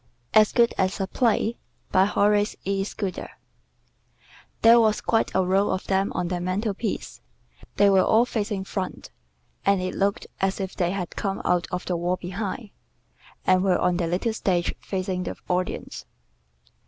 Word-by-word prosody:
"AS 215 Hz, -1 st, +6 dB
GOOD 235 Hz, -1 st, +3 dB
AS 190 Hz, +1 st, +1 dB
A 195 Hz, -, 0 dB
PLAY" 230 Hz, +1 st, +1 dB, 0.3 s
BY 190 Hz, +1 st, +5 dB
HORACE 205 Hz, 0 st, +2 dB
E. 195 Hz, 0 st, 0 dB
SCUDDER 195 Hz, -1 st, -4 dB, 1.3 s
There 230 Hz, +1 st, +8 dB
was 215 Hz, -2 st, +3 dB
quite 225 Hz, -, +1 dB
a 190 Hz, -1 st, +3 dB
row 195 Hz, +2 st, +2 dB
of 190 Hz, -, -2 dB
them 195 Hz, 0 st, +1 dB
on 180 Hz, -, -1 dB
the 180 Hz, -1 st, -2 dB
mantel 195 Hz, +4 st, -1 dB
piece. 210 Hz, +1 st, -4 dB, 0.5 s
They 205 Hz, -, +5 dB
were 195 Hz, -1 st, +5 dB
all 225 Hz, +2 st, +4 dB
facing 210 Hz, -4 st, -2 dB
front, 190 Hz, -1 st, -5 dB, 0.5 s
and 200 Hz, -1 st, +3 dB
it 185 Hz, 0 st, -3 dB
looked 200 Hz, +1 st, 0 dB
as 195 Hz, +1 st, 0 dB
if 190 Hz, -1 st, -4 dB
they 175 Hz, -2 st, 0 dB
had 180 Hz, -2 st, -4 dB
come 195 Hz, -1 st, -2 dB
out 180 Hz, -1 st, +1 dB
of 180 Hz, 0 st, -3 dB
the 180 Hz, -, -1 dB
wall 175 Hz, +2 st, 0 dB
behind, 200 Hz, +4 st, -5 dB, 0.7 s
and 185 Hz, 0 st, +4 dB
were 185 Hz, -2 st, +3 dB
on 180 Hz, -1 st, +1 dB
their 175 Hz, -2 st, 0 dB
little 185 Hz, +7 st, -1 dB
stage 180 Hz, -5 st, 0 dB
facing 185 Hz, -1 st, -3 dB
the -, -, -4 dB
audience. 180 Hz, 0 st, -3 dB
195 Hz, 165 wpm, -25 LUFS, 185-205 Hz, 1.3 s, There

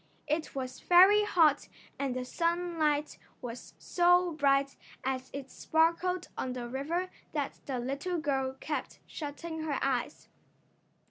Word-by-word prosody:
It 310 Hz, 0 st, -2 dB
was 255 Hz, -1 st, -4 dB
very 390 Hz, +4 st, +7 dB
hot 320 Hz, -8 st, +3 dB, 0.3 s
and 275 Hz, -3 st, -1 dB
the 255 Hz, 0 st, -3 dB
sunlight 335 Hz, -2 st, 0 dB, 0.2 s
was 240 Hz, -1 st, -8 dB
so 355 Hz, 0 st, +3 dB
bright 275 Hz, -2 st, +2 dB, 0.3 s
as 260 Hz, 0 st, -2 dB
it 275 Hz, -1 st, -7 dB
sparkled 335 Hz, +3 st, +1 dB
on 255 Hz, -, -3 dB
the 245 Hz, -1 st, -5 dB
river 320 Hz, +9 st, -2 dB, 0.2 s
that 290 Hz, -3 st, -3 dB
the 265 Hz, -3 st, -2 dB
little 280 Hz, +9 st, -2 dB
girl 270 Hz, -4 st, -1 dB
kept 300 Hz, -, -4 dB
shutting 320 Hz, +2 st, -6 dB
her 300 Hz, -3 st, -1 dB
eyes. 265 Hz, +1 st, -1 dB
295 Hz, 130 wpm, -31 LUFS, 265-340 Hz, 0.3 s, very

